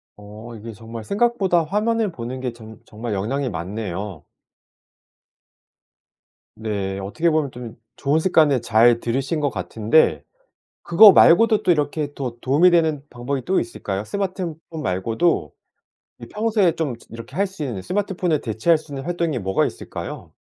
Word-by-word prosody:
어. 105 +3 -11
이게 110 +1 -9
정말 115 +1 -9
생각보다 200 - +1
화면을 210 +4 0
보는 125 -2 -6
게 125 -2 -3
정 110 -1 -12
정말 110 +1 -6
영향이 125 +7 -2
많네요. 95 -1 -5 2.3
네. 100 -3 -3
어떻게 155 - 0
보면 155 -3 +1
좀 120 -2 -9 0.2
좋은 145 +4 +1
습관을 155 -7 +3
잘 115 +1 +4
들이신 135 +6 -2
것 145 -2 +1
같은데 115 +6 +1 0.6
그거 200 +4 +8
말고도 215 +7 +5
또 - - +3
이렇게 150 -2 -1
더 125 -5 -5
도움이 145 +8 +4
되는 160 -4 +2
방법이 125 +2 -4
또 190 - +2
있을까요? 105 -3 -4
스마트폰 185 - -3 0.3
말고도 115 - 0 0.7
그 - - -10
평소에 210 -5 +1
좀 155 -6 -1
이 - - -12
이렇게 115 +5 -10
할 200 - +2
수 190 -5 -9
있는 115 -9 -4
스마트폰을 185 - -1
대체할 115 +9 +2
수 155 -1 -11
있는 135 0 -5
활동이 170 -5 -1
뭐가 95 -2 0
있을까요? - - -7
135 Hz, 315 characters per minute, -22 LUFS, 110-170 Hz, 2.3 s, 그거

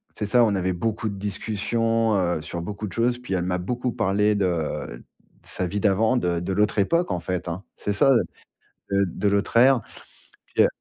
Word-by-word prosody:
c'est 105 - -2
ça, 120 +4 +4
on 105 -3 +2
avait 95 -1 0
beaucoup 110 +4 -2
de 100 - -3
discussions, 110 +3 0
heu, 85 -3 0
sur 85 +3 -5
beaucoup 105 +4 -5
de - - -9
choses. 120 +1 +1
Puis, 125 -6 -5
elle 90 - 0
m'a 90 0 0
beaucoup 125 +7 -2
parlé 105 +2 +2
de 85 -10 -2 0.4
sa 90 - -3
vie 105 +4 -2
d'avant, 110 +5 +2
de 90 -7 0
de 90 +3 -4
l'autre 105 +2 +1
époque, 170 - +2
en 90 - -1
fait, 90 +1 -3
hein, 85 +3 -4
c'est 105 - -2
ça, 135 +6 +4
heu, 120 - +4 0.7
de 100 0 +3
de 95 +3 -2
l'autre 100 +3 +1
ère. 130 0 +6 0.7
Puis, - - +3
heu - - +5
100 Hz, 205 wpm, -24 LUFS, 90-115 Hz, 0.7 s, ère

